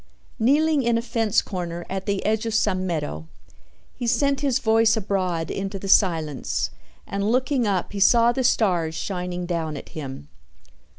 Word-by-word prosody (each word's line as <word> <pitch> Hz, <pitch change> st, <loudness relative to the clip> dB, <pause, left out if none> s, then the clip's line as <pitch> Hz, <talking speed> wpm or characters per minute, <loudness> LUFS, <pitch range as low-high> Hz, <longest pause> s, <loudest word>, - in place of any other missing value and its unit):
Kneeling 295 Hz, +5 st, +3 dB
in 235 Hz, -2 st, +2 dB
a -, -, 0 dB
fence 225 Hz, -3 st, +1 dB
corner 175 Hz, -2 st, -5 dB
at 190 Hz, 0 st, -5 dB
the 200 Hz, -1 st, -1 dB
edge 220 Hz, +1 st, 0 dB
of 225 Hz, -, -2 dB
some 185 Hz, -4 st, +1 dB
meadow, 80 Hz, -, -3 dB, 0.7 s
he 240 Hz, -, -5 dB
sent 280 Hz, +3 st, +2 dB
his 275 Hz, -4 st, +2 dB
voice 225 Hz, 0 st, +3 dB
abroad 185 Hz, -5 st, -1 dB
into 195 Hz, 0 st, -4 dB
the 195 Hz, -, -7 dB
silence 165 Hz, -, +1 dB, 0.3 s
and 200 Hz, +1 st, -2 dB
looking 255 Hz, -1 st, +1 dB
up 190 Hz, -3 st, -1 dB
he 200 Hz, -, -3 dB
saw 230 Hz, +4 st, +5 dB
the 260 Hz, +1 st, -1 dB
stars 180 Hz, -9 st, +1 dB
shining 180 Hz, 0 st, -4 dB
down 165 Hz, -4 st, -3 dB
at -, -, -10 dB
him. 135 Hz, -, -7 dB
200 Hz, 165 wpm, -23 LUFS, 175-230 Hz, 0.7 s, saw